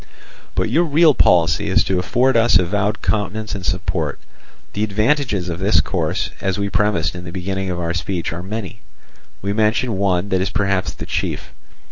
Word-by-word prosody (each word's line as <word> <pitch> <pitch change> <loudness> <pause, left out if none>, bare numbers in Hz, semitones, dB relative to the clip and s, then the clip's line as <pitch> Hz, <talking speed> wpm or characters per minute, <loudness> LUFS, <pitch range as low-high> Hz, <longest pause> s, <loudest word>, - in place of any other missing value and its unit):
"But - - 0
your 170 +2 +3
real 155 0 +5
policy 85 - +3
is - - +3
to 95 -1 0
afford 125 +8 +2
us 115 -2 +5
avowed 105 +4 -1
countenance 105 +1 -1
and 100 -3 -5
support. 90 +1 -2 0.5
The 105 - -1
advantages 110 - 0
of 85 -1 -4
this 95 -4 +3
course, 70 - -1
as 95 -1 -1
we 100 0 -1
premised 100 -6 +1
in 90 -1 -8
the 85 - -7
beginning 95 +1 -3
of 90 -1 -3
our 85 -1 -2
speech, 85 -1 -3
are 85 - -5
many. 100 +1 -6 0.6
We 100 +1 -1
mention 110 0 +1
one 95 -1 +1
that 95 -1 +1
is 95 - 0
perhaps 100 -1 0
the - - -8
chief. - - -3
95 Hz, 180 wpm, -20 LUFS, 90-110 Hz, 0.6 s, real